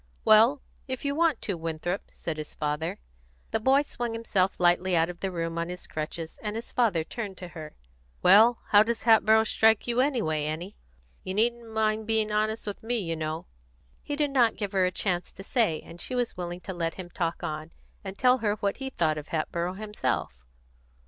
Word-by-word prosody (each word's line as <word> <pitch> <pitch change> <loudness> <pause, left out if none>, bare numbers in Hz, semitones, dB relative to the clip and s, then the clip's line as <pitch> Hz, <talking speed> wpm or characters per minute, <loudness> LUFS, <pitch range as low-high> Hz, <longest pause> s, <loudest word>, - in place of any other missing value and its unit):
"Well, 230 +6 +6 0.2
if 260 +1 -3
you 280 - +1
want 320 -4 +1
to, 200 - -1
Winthrop," 165 +3 -4
said 160 -2 -5
his 155 -1 -7
father. 150 +2 -2 0.5
The 225 - +1
boy 270 +5 +4
swung 240 -5 -4
himself 200 -4 0
lightly 180 +1 +3
out 165 +1 +2
of 175 - -15
the 195 - -2
room 165 -1 -3
on 170 +1 -2
his 180 0 -6
crutches, 160 +1 -5
and 210 -1 -3
his 230 - -5
father 210 -10 +2
turned 200 +2 -6
to 180 - -8
her. 155 -3 -9 0.5
"Well, 220 +6 +6
how 205 - +7
does 230 +1 0
Hatboro' 220 -1 +5
strike 220 0 +3
you, 240 +1 +1
anyway, 215 - 0
Annie? 165 +6 -4 0.5
You 185 - -4
needn't 235 +1 +1
mind 220 0 0
being 220 -1 +1
honest 215 +1 0
with 205 -1 -5
me, 240 +2 -1
you 165 -6 -2
know." 155 0 -4 0.6
He 290 - -4
did 295 -1 0
not 245 -4 +3
give 205 -3 -3
her 190 -2 +3
a - - -1
chance 180 -1 -2
to 195 - -10
say, 205 - +1
and 170 0 -11
she 255 - -3
was 245 -1 -1
willing 175 0 -5
to 190 - -6
let 165 -2 -2
him 180 -2 -8
talk 170 -1 -2
on, 155 +1 -4 0.3
and 195 -1 -7
tell 255 +1 +4
her 210 -2 +1
what 200 -1 -2
he 270 0 -4
thought 155 -10 0
of 150 - -10
Hatboro' 170 +2 -2
himself. 205 - -3
200 Hz, 200 wpm, -27 LUFS, 170-225 Hz, 0.6 s, how